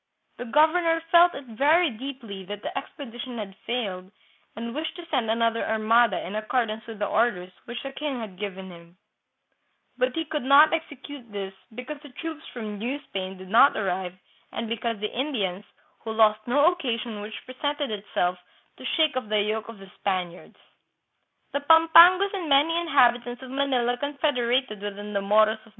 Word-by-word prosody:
The 245 - -6
governor 330 +6 +3
felt 345 0 +6
it 280 - -7
very 315 +4 +4
deeply 230 -5 -7
that 205 +2 -7
the - - -5
expedition 255 -3 -7
had 200 -3 -6
failed, 195 -7 -3 0.5
and 230 +1 -5
wished 310 +5 -4
to 350 -1 -9
send 250 -7 0
another 230 0 +1
armada 220 0 +2
in 185 - -6
accordance 215 0 -2
with 225 -2 -8
the 205 - -1
orders 195 -5 0
which 240 0 -6
the 275 - -5
king 280 -2 -4
had 200 -5 -8
given 190 -2 -6
him; 170 +1 -15 1.0
but 255 0 +1
he 325 0 -1
could 300 -1 -3
not 280 +5 +6
execute 285 -6 -6
this 195 -1 -5 0.2
because 255 +5 -7
the 290 - -12
troops 320 +2 -6
from 215 -4 -6
New 250 +6 -2
Spain 190 0 -5
did 185 0 -11
not 235 +7 +6
arrive, 185 -3 -2 0.4
and 230 - -4
because 230 +1 -2
of 205 - -16
the 210 - -3
Indians, 210 -8 -2 0.3
who 225 - -6
lost 215 0 +3
no 290 +7 +4
occasion 235 -10 -4
which 215 +1 -8
presented 285 +1 -3
itself 180 -3 -2 0.4
to - - -11
shake 310 -3 +3
off 255 -5 -3
the 215 0 +2
yoke 215 +1 -2
of 230 - -9
the 195 -1 -14
Spaniards. 180 -3 -3 0.5
" - - -48
The 285 - +1
Pampangos 330 +6 +7
and 360 -5 -4
many 290 +4 +4
inhabitants 245 -7 +2
of 255 - -9
Manila 255 -3 0
con 285 +2 -4
federated 250 -6 0
with 205 -1 -5
the 205 0 -4
Moros 215 +2 +3
of 225 - -19
235 Hz, 180 wpm, -25 LUFS, 210-285 Hz, 1.0 s, Pampangos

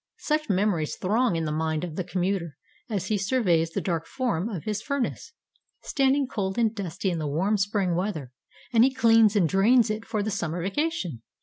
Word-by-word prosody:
Such 305 -2 -1
memories 190 -5 +1
throng 215 +1 +1
in 165 -1 -1
the 155 - -2
mind 160 0 -1
of 170 -3 -5
the 185 - -2
commuter 180 -4 -2 0.3
as 195 -4 -2
he 210 -2 +1
surveys 190 -6 +2
the - - -3
dark 165 -3 -2
form 230 -7 -1
of 185 -9 -5
his 210 -1 -2
furnace, 280 0 -3 0.5
standing 275 0 +2
cold 195 -7 -3
and 230 -2 +2
dusty 190 -2 -3
in 170 - -2
the 155 - -2
warm 180 +9 +1
spring 200 -2 0
weather, 170 -8 -3 0.4
and 230 0 +6
he 265 - +4
cleans 225 -4 +5
and 185 -5 +4
drains 215 - +4
it 215 +1 -4
for 220 -2 -2
the 215 - -2
summer 170 -3 -2
vacation. 195 - -2
195 Hz, 195 wpm, -26 LUFS, 170-225 Hz, 0.5 s, and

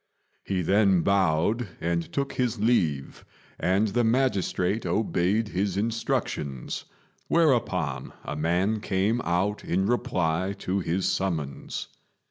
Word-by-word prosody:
He 95 -2 -1
then 100 -1 +4
bowed 100 +5 +2
and 85 0 -1
took 140 -1 -2
his 120 -3 -1
leave, 85 - +1 0.4
and 95 +5 +2
the 120 +4 +1
magistrate 110 -4 +1
obeyed 100 +3 +1
his 95 0 -1
instructions, 100 - -2 0.4
whereupon 90 - +1
a - - -4
man 90 +8 +1
came 105 +4 0
out 90 +5 0
in 95 +2 0
reply 95 -6 0
to 95 0 -1
his 90 +1 -1
summons. 80 -8 -2
95 Hz, 110 wpm, -26 LUFS, 85-110 Hz, 0.4 s, then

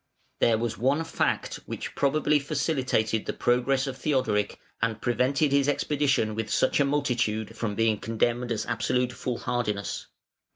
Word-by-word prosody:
There 115 -1 +4
was 115 0 -3
one 135 +7 +2
fact 160 - -1
which - - -5
probably 150 +1 +2
facilitated 130 -7 0
the - - -1
progress 130 +3 +2
of 135 -2 -4
Theodoric, 130 -9 0 0.2
and 115 -1 0
prevented 135 +4 +1
his 140 0 +3
expedition 140 -6 +1
with 110 0 -3
such 130 - +2
a 140 - +4
multitude 120 -6 0
from 110 -2 -2
being 110 -1 +2
condemned 120 +2 0
as 110 -1 -1
absolute 125 +1 0
foolhardiness. 120 -5 -3
125 Hz, 140 wpm, -27 LUFS, 115-140 Hz, 0.2 s, There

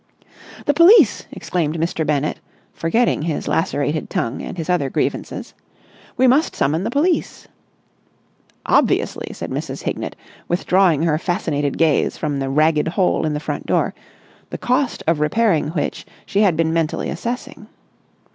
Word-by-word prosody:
"The 290 - +3
police!" 335 - +6
exclaimed 165 -3 -2
Mr. 165 0 -1
Bennett, 150 -1 -1 0.3
forgetting 225 +4 +1
his 160 -1 -3
lacerated 150 -1 -1
tongue 115 - -2
and - - -7
his 165 - -4
other 175 -7 +1
grievances. - - -3 0.6
"We 260 - +4
must 270 +6 +3
summon 155 +6 0
the - - -1
police!" 315 +8 0 1.2
"Obviously!" - - +1
said - - -7
Mrs. - - -5
Hignett, - - -4 0.3
withdrawing 175 -2 +2
her 155 -2 +1
fascinated 150 -6 -1
gaze 160 -3 +2
from 145 -3 -2
the 135 0 -2
ragged 155 +2 +2
hole 180 -2 +1
in 150 - -1
the - - -2
front - - -5
door, - - +1 0.6
the - - -5
cost 255 +1 0
of 165 -1 +1
repairing 165 +1 +2
which 155 -1 -3 0.2
she 200 0 0
had 185 -7 +3
been 160 0 +1
mentally 165 -2 -1
assessing. 240 +2 -5
165 Hz, 145 wpm, -20 LUFS, 150-205 Hz, 1.2 s, police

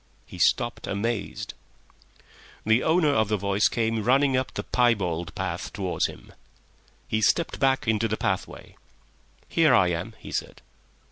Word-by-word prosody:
He 90 - -11
stopped, 120 +7 +1
amazed. 105 +2 -3 1.1
The 110 +3 +4
owner 160 -2 +3
of 110 -6 +2
the 105 0 0
voice 100 +1 +2
came 115 -2 -1
running 135 +3 +3
up 130 0 -1
the - - -5
piebald 90 -9 0
path 90 -2 -4
towards 95 -4 -1
him. - - -13 0.7
He 110 - -1
stepped 165 +9 +1
back 135 -3 +2
into 110 0 +2
the 110 0 -2
pathway. 95 -1 -4 0.7
"Here 155 -6 +4
I 90 -6 +4
am," 90 +6 -4
he - - -11
said. - - -5
110 Hz, 145 wpm, -25 LUFS, 95-125 Hz, 1.1 s, The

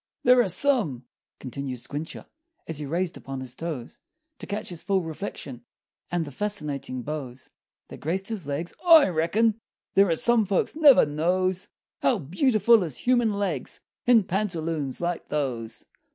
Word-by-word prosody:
"There 250 0 +6
are 235 - +1
some," 185 - +1 0.3
continued 130 0 -5
Squincher, 145 +6 -7 0.4
As 160 -2 -3
he 150 - -4
raised 175 +4 -1
upon 135 -1 -7
his 130 -1 -7
toes 155 -7 -6 0.4
To - - -8
catch 210 +1 -3
his 175 -3 -5
full 195 -3 0
reflection, 150 -7 -6 0.5
And 175 -2 -1
the 145 - -8
fascinating 145 -9 -3
bows 135 -3 -6 0.4
That - - -10
graced 190 +6 -2
his 205 -10 -4
legs, 150 +5 -3
"I 325 - +8
reckon 205 +7 +1 0.3
There 195 0 +5
are 165 - +2
some 230 +3 +3
folks 195 +7 0
never 300 -4 +7
knows 180 +5 0 0.3
How 245 - +3
beautiful 215 - +3
is 155 -8 -4
human 240 -3 +2
legs 195 -9 -3 0.3
In 235 -4 +6
pantaloons 165 -8 -2
like 175 0 -2
those!" 120 -6 -3
170 Hz, 150 wpm, -26 LUFS, 145-210 Hz, 0.5 s, I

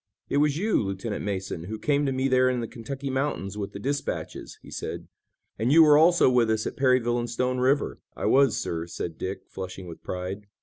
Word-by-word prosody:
"It - - +1
was 145 0 +3
you, 210 +5 +2
Lieutenant 100 +2 -3
Mason, 95 -4 -3
who 110 +4 -5
came 145 +3 +1
to - - +1
me 130 +1 0
there 130 -1 +4
in 125 -1 0
the 115 - -3
Kentucky 135 +5 -6
mountains 130 -8 -2
with 100 -2 -4
the 100 - -7
dispatches," 140 +7 -4
he - - -12
said, - - -5 0.5
"and 115 +4 +1
you 165 +2 +8
were 150 -1 +7
also 170 +3 +6
with 125 -3 +3
us 110 -1 0
at - - -4
Perryville 125 -3 +2
and 120 0 -3
Stone 125 +2 -1
River." 135 +3 +1 0.2
"I - - -4
was, 135 -4 +4
sir," 85 0 -3
said 85 -1 -6
Dick, 95 +1 -4
flushing 95 0 -7
with 85 -2 -10
pride. 95 +3 -5
120 Hz, 215 wpm, -26 LUFS, 100-135 Hz, 0.5 s, you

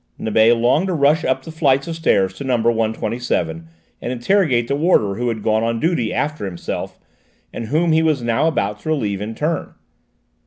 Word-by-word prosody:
Nibet 110 +2 +3
longed 125 +10 +2
to 185 - -1
rush 150 +2 +3
up 130 0 0
the 160 - -8
flights 140 -3 +1
of 165 - -4
stairs 95 - +1
to 95 - -8
number 120 -3 +2
127 110 -7 -2 0.3
and 120 - -3
interrogate 125 - +1
the 140 - 0
warder 145 - +2
who 120 +5 -3
had 110 -3 -3
gone 110 0 +1
on 115 0 -1
duty 160 -8 0
after 150 -7 -2
himself, 90 -3 -5 0.6
and 115 - -5
whom 160 +6 +1
he 160 0 +4
was 155 -6 +1
now 115 +6 +1
about 105 -10 -1
to 155 - -6
relieve 105 -10 -1
in 110 +2 -5
turn. 155 +6 -3
120 Hz, 190 wpm, -19 LUFS, 110-155 Hz, 0.6 s, he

